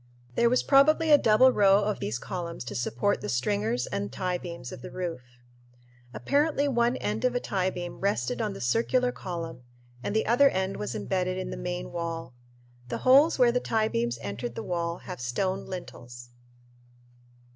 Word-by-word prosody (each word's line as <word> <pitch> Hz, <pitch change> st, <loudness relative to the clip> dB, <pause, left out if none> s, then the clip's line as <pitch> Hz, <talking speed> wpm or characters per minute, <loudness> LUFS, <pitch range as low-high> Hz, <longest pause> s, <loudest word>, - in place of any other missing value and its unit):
There 235 Hz, -, +3 dB
was 250 Hz, -, +2 dB
probably 310 Hz, +3 st, +4 dB
a 295 Hz, -, +9 dB
double 245 Hz, +3 st, +5 dB
row 200 Hz, -2 st, +4 dB
of 210 Hz, 0 st, -1 dB
these 110 Hz, -, -2 dB
columns 170 Hz, +2 st, -5 dB
to 120 Hz, -4 st, -7 dB
support 120 Hz, -, 0 dB
the -, -, -4 dB
stringers 120 Hz, 0 st, 0 dB
and 100 Hz, +1 st, -4 dB
tiebeams 175 Hz, -5 st, -4 dB
of -, -, -9 dB
the -, -, -8 dB
roof. 175 Hz, -7 st, -4 dB, 0.9 s
Apparently 285 Hz, -, +1 dB
one 240 Hz, -1 st, +1 dB
end 215 Hz, +3 st, -3 dB
of 250 Hz, -1 st, +1 dB
a -, -, +2 dB
tiebeam 185 Hz, -4 st, -3 dB
rested 210 Hz, +5 st, 0 dB
on 210 Hz, -2 st, -1 dB
the -, -, -9 dB
circular 245 Hz, -, +1 dB
column 170 Hz, -, -6 dB, 0.4 s
and 200 Hz, -, -3 dB
the 220 Hz, -, +2 dB
other 245 Hz, +5 st, +5 dB
end 190 Hz, -2 st, -2 dB
was 210 Hz, -, -4 dB
embedded 185 Hz, -1 st, -1 dB
in 185 Hz, -, -4 dB
the -, -, -4 dB
main 180 Hz, 0 st, -4 dB
wall. 165 Hz, -5 st, -4 dB, 0.6 s
The -, -, -2 dB
holes 275 Hz, +6 st, +6 dB
where 245 Hz, -2 st, +5 dB
the 250 Hz, +1 st, 0 dB
tiebeams 120 Hz, -, 0 dB
entered 115 Hz, +4 st, -5 dB
the -, -, -5 dB
wall 170 Hz, -1 st, -2 dB
have -, -, -7 dB
stone 185 Hz, +11 st, -2 dB
lintels. 120 Hz, -9 st, -9 dB
185 Hz, 170 wpm, -27 LUFS, -, 0.9 s, a